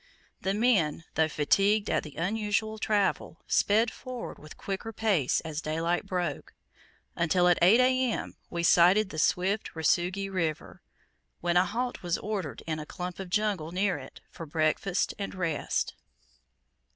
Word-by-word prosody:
The 195 +1 0
men, 200 -10 +2
though 160 0 +3
fatigued 200 +8 +2
at - - +1
the 150 - -11
unusual 215 +3 -1
travel, 200 -6 0
sped 220 +3 +3
forward 255 -2 -7
with 155 - -12
quicker, 200 +3 -4
pace 200 - +1
as 160 -1 -5
daylight 165 +4 -1
broke, 180 -3 -3 0.6
until, 175 +1 +2
at 175 - +4
8 190 +8 +6
A.M., 255 -1 +1
we 170 -1 -3
sighted 185 +4 +5
the 155 - -4
swift 190 +6 0
Rusugi 180 +5 +1
River, 170 -5 -3 0.6
when 175 0 0
a 180 +1 +5
halt 245 +5 -3
was 175 -1 -1
ordered 190 - -4
in 155 -1 -3
a 150 - -6
clump 180 0 -6
of 190 -2 -6
jungle 200 -5 0
near 185 0 0
it, 130 - -12
for 165 - -8
breakfast 160 +5 0
and 200 -1 -4
rest. 165 -5 -1
180 Hz, 150 wpm, -28 LUFS, 165-210 Hz, 0.6 s, 8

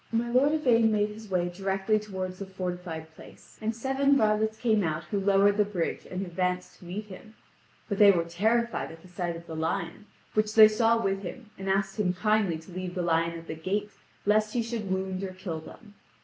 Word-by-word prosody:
My 235 +1 0
lord 265 +4 +4
Yvain 235 -7 +4
made 210 0 +2
his 215 0 -10
way 180 -2 +1
directly 195 +3 0
toward 190 -3 -5
the 195 +1 -8
fortified 180 -4 -5
place, - - -16
and 220 +1 -1
seven 270 +3 +2
varlets 220 -1 +2
came 220 -3 +2
out 155 -2 -1
who 205 - -2
lowered 200 +1 +4
the 210 - +5
bridge 195 -5 -3
and 185 +1 -3
advanced 180 +1 -2
to - - -14
meet 195 +5 -5
him. 210 +2 -12 0.5
But 200 -3 -3
they 205 -1 +9
were 175 -4 +4
terrified 220 +8 0
at 165 +2 -13
sight 175 -1 -3
of 170 0 -10
the 160 - -7
lion, 165 +5 -3 0.3
which 215 0 +1
they 220 -1 +10
saw 225 +1 +3
with 195 -3 0
him, 215 +4 -8
and 195 0 -5
asked 195 +1 0
him 180 -3 +2
kindly 200 -2 +2
to 160 +3 -13
leave 180 0 -5
the 180 - -1
lion 165 0 +1
at 165 - -10
the 160 - -5
gate 200 +6 -2 0.3
lest 215 +2 +2
he 235 - +2
should 225 -3 -4
wound 190 0 -2
or 190 -1 -4
kill 185 -4 -5
them. 205 +6 -13
195 Hz, 210 wpm, -28 LUFS, 180-215 Hz, 0.5 s, they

